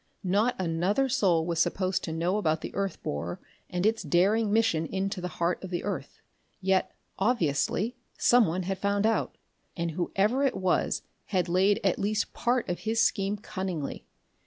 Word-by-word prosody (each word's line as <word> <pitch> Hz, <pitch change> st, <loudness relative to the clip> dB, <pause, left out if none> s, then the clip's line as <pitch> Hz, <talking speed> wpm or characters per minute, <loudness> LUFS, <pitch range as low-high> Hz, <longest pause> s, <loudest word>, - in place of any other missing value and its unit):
Not 205 Hz, +6 st, +2 dB
another 185 Hz, +9 st, +1 dB
soul 185 Hz, -11 st, +2 dB
was 170 Hz, -1 st, -1 dB
supposed 185 Hz, +1 st, +1 dB
to 165 Hz, -, -4 dB
know 170 Hz, +5 st, 0 dB
of 160 Hz, -5 st, 0 dB
the -, -, -6 dB
earth 195 Hz, -3 st, -3 dB
borer 85 Hz, +4 st, -3 dB, 0.3 s
and 180 Hz, +1 st, -1 dB
its 220 Hz, +1 st, +2 dB
daring 195 Hz, +7 st, +2 dB
mission 210 Hz, -8 st, +2 dB
into 195 Hz, -1 st, -2 dB
the 180 Hz, -, -2 dB
heart 170 Hz, +2 st, 0 dB
of 190 Hz, -, -5 dB
the 175 Hz, -1 st, -3 dB
earth. -, -, -5 dB, 0.4 s
Yet, 190 Hz, 0 st, +1 dB, 0.3 s
obviously, 195 Hz, -, +1 dB, 0.2 s
someone 185 Hz, -7 st, +4 dB
had 190 Hz, +1 st, -3 dB
found 200 Hz, +1 st, +1 dB
out, 225 Hz, -, 0 dB, 0.4 s
and 170 Hz, -1 st, -1 dB
whoever 195 Hz, -, +1 dB
it 270 Hz, -, +1 dB
was 185 Hz, -1 st, +1 dB, 0.2 s
had 185 Hz, -3 st, 0 dB
laid 190 Hz, +4 st, +3 dB
at 195 Hz, -, +2 dB
least 210 Hz, +1 st, -1 dB
part 245 Hz, +1 st, 0 dB
of 175 Hz, -1 st, -2 dB
his 225 Hz, +1 st, -1 dB
scheme 205 Hz, -3 st, +2 dB
cunningly. 185 Hz, -7 st, -5 dB
190 Hz, 165 wpm, -28 LUFS, 175-210 Hz, 0.4 s, someone